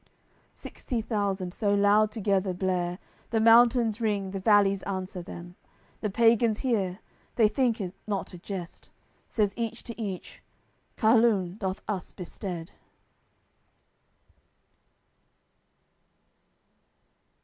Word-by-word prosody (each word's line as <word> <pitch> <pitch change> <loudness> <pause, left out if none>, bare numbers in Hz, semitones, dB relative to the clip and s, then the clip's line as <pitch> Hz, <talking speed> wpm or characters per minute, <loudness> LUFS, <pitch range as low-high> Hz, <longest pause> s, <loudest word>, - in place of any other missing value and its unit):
Sixty 245 - -5
thousand 200 -5 -2
so 205 -1 +1
loud 205 +1 +4
together 195 -3 0
blare, 180 -1 -1 0.3
The 225 - +1
mountains 230 0 +5
ring, 200 -3 -1
the 195 - -4
valleys 200 -1 +4
answer 190 -1 -4
them. 175 +1 -10 0.4
The 215 - -2
pagans 225 0 +3
hear, 205 -6 -1 0.3
they 225 -3 +5
think 235 +1 +1
it 185 -3 -4
not 200 -3 -3
a 180 - -9
jest; 180 -2 -7 0.4
Says 205 -3 +1
each 230 0 -4
to 235 -1 -7
each: 195 -4 -6 0.6
"Carlum 220 -5 +3
doth 190 -1 -3
us 195 -4 -3
bestead." 180 -1 -6
205 Hz, 105 wpm, -27 LUFS, 185-225 Hz, 0.6 s, mountains